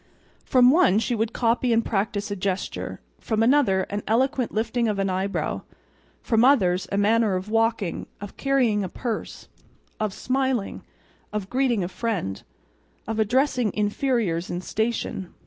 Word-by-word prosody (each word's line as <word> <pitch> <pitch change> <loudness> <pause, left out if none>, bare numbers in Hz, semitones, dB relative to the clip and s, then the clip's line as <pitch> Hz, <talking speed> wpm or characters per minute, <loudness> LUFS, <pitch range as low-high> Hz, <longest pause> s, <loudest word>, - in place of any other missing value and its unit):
From 250 -1 +5
one 315 - +4
she 225 +2 0
would 225 0 0
copy 235 +1 +1
and 230 0 +2
practice 205 0 -1
a - - -1
gesture, 190 0 -3 0.2
from 220 -1 0
another 230 -7 +3
an 205 +2 -4
eloquent 255 +3 +1
lifting 230 +2 0
of 210 -2 -1
an 195 -1 0
eyebrow, 190 +2 -2 0.6
from 225 -1 +2
others, 195 -9 +3
a 200 - 0
manner 215 0 +3
of 185 +3 -4
walking, 225 -4 0
of 205 -1 -9
carrying 250 -7 +1
a 185 - -4
purse, 230 +3 -5 0.5
of 215 -2 -1
smiling, 260 -1 -1 0.5
of 205 -2 -4
greeting 250 -6 +1
a - - -2
friend, 190 - -3 0.7
of 225 0 -2
addressing 245 0 +2
"inferiors 210 -5 0
in 175 - -3
station." 220 -3 -3
220 Hz, 145 wpm, -24 LUFS, 200-245 Hz, 0.7 s, From